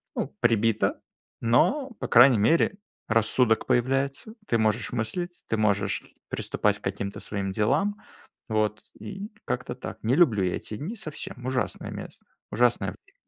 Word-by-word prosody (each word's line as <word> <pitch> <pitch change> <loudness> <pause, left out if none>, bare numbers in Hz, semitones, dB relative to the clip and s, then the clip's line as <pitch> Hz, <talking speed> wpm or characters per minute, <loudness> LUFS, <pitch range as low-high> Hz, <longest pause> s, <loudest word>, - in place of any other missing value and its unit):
ну, - - -3
прибито, 115 -2 +2 0.4
но, 260 - +2
по - - -3
крайней 120 -1 +7
мере, 165 - +3 0.3
рассудок 115 +1 +2
появляется. 135 - 0
Ты 115 - +2
можешь 110 0 +1
мыслить, 175 +10 -3
ты - - 0
можешь 105 -2 +1 0.3
приступать - - 0
к - - -32
каким-то 100 0 -3
своим 100 -2 -3
делам. 145 - +1 0.5
Вот, 110 -1 0 0.2
и 200 +1 -7 0.2
как-то - - -3
так. - - -7
Не 115 +4 +2
люблю 125 - +4
я 90 - 0
эти 105 - -6
дни 185 - -5
совсем. 150 - -7
Ужасное 130 0 -2
мес - - -8 0.3
Ужасное 120 -4 +2
время. 90 - -14
120 Hz, 145 wpm, -26 LUFS, 110-145 Hz, 0.5 s, крайней